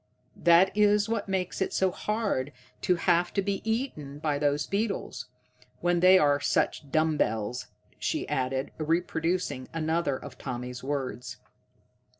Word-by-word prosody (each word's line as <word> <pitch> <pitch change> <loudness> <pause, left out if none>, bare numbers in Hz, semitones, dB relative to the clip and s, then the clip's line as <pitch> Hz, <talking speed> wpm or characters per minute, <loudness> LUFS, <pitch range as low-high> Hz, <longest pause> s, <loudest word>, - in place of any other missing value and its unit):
That 175 +3 +6
is 210 0 +4
what 220 -3 -2
makes 185 -1 -2
it 190 - 0
so 190 -1 +2
hard 205 - -1 0.3
to 180 - +2
have 175 0 +2
to 200 - +3
be 195 0 -1
eaten 220 - -3
by 150 -1 -1
those 145 0 +1
beetles, 200 +1 -2 0.5
when 175 0 +2
they 185 +2 +7
are 145 -4 +3
such 145 0 0
dumb 155 0 +2
bells," 110 +1 -1 0.3
she - - -1
added, 130 +1 -1
reproducing 165 -3 -1
another 160 -3 0
of 140 -2 -11
Tommy's 125 -1 -5
words. 130 -4 -4
165 Hz, 140 wpm, -28 LUFS, 140-190 Hz, 0.5 s, they